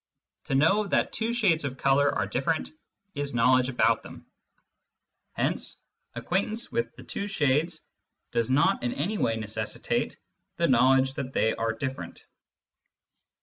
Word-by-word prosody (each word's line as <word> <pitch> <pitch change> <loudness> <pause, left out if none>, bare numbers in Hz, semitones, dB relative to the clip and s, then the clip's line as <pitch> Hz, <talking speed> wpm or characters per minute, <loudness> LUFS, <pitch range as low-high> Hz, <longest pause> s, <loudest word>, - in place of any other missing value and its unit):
To 135 - -1
know 195 +9 +3
that - - +1
two 225 +1 -1
shades 200 -9 +2
of 135 -2 -4
colour 140 +1 +3
are - - -1
different 155 +5 -1 0.4
is 145 -2 -3
knowledge 125 +2 +4
about 125 - +2
them; - - -12 1.1
hence - - -1 0.4
acquaintance 215 +5 -2
with 235 0 -2
the - - -12
two 200 - -4
shades 160 -3 +1 0.5
does 115 0 0
not 140 +3 +3
in 120 - -1
any 195 +10 -2
way 115 - +1
necessitate 110 -1 -3 0.4
the 170 - +2
knowledge 130 +1 +4
that 135 -1 -5
they 110 - +2
are 115 0 -1
different. 130 +4 -6
140 Hz, 140 wpm, -27 LUFS, 130-175 Hz, 1.1 s, knowledge